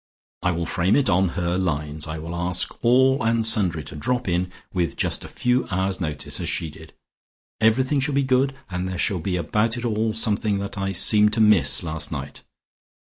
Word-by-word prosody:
I 90 - +1
will 85 -1 -2
frame 90 +4 +1
it 135 -7 +2
on 95 +1 +3
her 90 +1 0
lines; 75 -3 -3
I 80 +1 -5
will 80 +2 -7
ask 90 +1 -1
all 130 +3 +4
and 115 0 +1
sundry 90 -8 +3
to - - -8
drop 125 +9 -2
in 90 0 -1 0.2
with 90 -3 -1
just - - -1
a - - -8
few 125 +1 0
hours' 95 0 -1
notice, 75 -4 -2
as - - -3
she 80 - -2
did. 80 +1 -14 0.7
Everything 130 +6 +2
shall 140 +1 -1
be 140 - +2
good, 135 +1 +1 0.2
and 90 +1 -3
there 95 - -4
shall 95 +1 0
be 90 +3 -2
about 105 +8 0
it 120 - -4
all 110 -1 0
something 105 -2 0
that 100 0 -5
I 95 -1 -2
seemed 105 +3 +4
to 110 - 0
miss 85 -11 +4
last 80 -2 -4
night. 70 -2 -6
95 Hz, 205 wpm, -23 LUFS, 85-115 Hz, 0.7 s, all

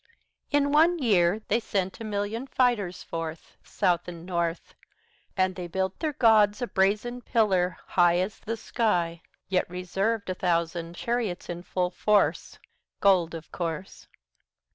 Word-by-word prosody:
In 285 -1 +2
one 325 +4 +5
year 205 - +2
they - - +2
sent 195 -2 -2
a - - -6
million 215 +4 -3
fighters 235 -9 0
forth 165 -1 -6
South 180 -3 0
and 170 -1 -8
North, 170 -2 -2 0.6
And 185 0 +2
they 180 -1 -5
built 190 +2 -2
their 310 -2 -1
gods 215 -4 +4
a 245 - -1
brazen 215 +4 0
pillar 190 -7 +1
high 175 -1 +3
75 180 +1 +2
As 210 - -11
the 230 +1 -4
sky, 175 -8 0 0.3
Yet 185 -2 0
reserved 195 +5 -2
a - - 0
thousand 170 -1 -1
chariots 230 -4 -2
in 175 0 -4
full 180 0 -1
force 210 +1 +1 0.4
Gold, 180 -4 +3
of 160 -1 -9
course. 170 +2 -5
190 Hz, 145 wpm, -27 LUFS, 175-225 Hz, 0.6 s, one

